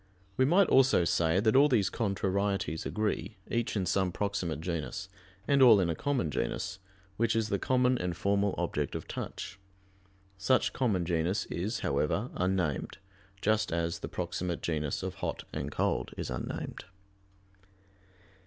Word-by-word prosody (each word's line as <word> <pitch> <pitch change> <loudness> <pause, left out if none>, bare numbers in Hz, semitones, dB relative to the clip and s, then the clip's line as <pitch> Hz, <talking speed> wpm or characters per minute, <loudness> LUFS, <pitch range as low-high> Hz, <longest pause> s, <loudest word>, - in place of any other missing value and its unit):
We 130 - +3
might 180 +7 +5
also 130 -8 +5
say 85 +2 +2
that 110 +2 +2
all 145 +2 +7
those 110 -7 +2
contrarieties 100 -5 -1
agree, 110 0 -2
each 120 -1 0
in 95 -3 0
some 95 0 +1
proximate 95 -6 -2
genus, 85 +3 -4 0.4
and 140 -1 +4
all 115 -5 +8
in 85 -3 +1
a - - -2
common 125 - -1
genus, 95 +8 -2 0.4
which 115 0 +2
is 110 -1 +1
the 100 - 0
common 125 +1 +2
and 90 -1 -2
formal 100 0 +1
object 75 -5 -2
of - - -5
touch. 100 - -6 0.8
Such 130 +7 +2
common 105 -9 +1
genus 85 +3 0
is, 105 +8 -2
however, 75 - 0
unnamed, 90 -5 -1 0.5
just 110 +1 +2
as 85 0 -1
the - - -6
proximate 90 -1 -3
genus 75 -3 -1
of - - -3
hot - - -3
and - - -3
cold - - -1
is - - -4
unnamed. - - -5
100 Hz, 150 wpm, -30 LUFS, 85-115 Hz, 0.8 s, all